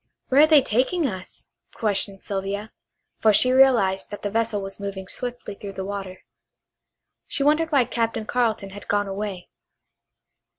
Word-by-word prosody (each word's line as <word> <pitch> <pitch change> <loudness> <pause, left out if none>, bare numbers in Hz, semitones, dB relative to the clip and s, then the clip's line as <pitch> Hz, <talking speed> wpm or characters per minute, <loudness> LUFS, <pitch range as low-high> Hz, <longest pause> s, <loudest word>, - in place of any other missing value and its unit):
"Where 270 +2 +6
are 310 - +7
they 305 -4 +6
taking 265 +9 +1
us?" 190 -7 -6 0.3
questioned 200 -3 -1
Sylvia, 200 +2 -4 0.5
for 220 - +5
she 255 +5 +5
realized 235 -8 +4
that 205 - -8
the 205 - -2
vessel 225 -1 0
was 195 0 -6
moving 195 -1 -6
swiftly 245 -2 -4
through 200 0 -8
the 190 0 -5
water. 195 -2 -6 1.1
She 275 - -1
wondered 310 +3 +2
why 275 -4 +4
Captain 230 -2 -2
Carleton 220 -5 -1
had 205 +1 -11
gone 205 0 +1
away. 195 -2 -5
210 Hz, 155 wpm, -24 LUFS, 195-250 Hz, 1.1 s, are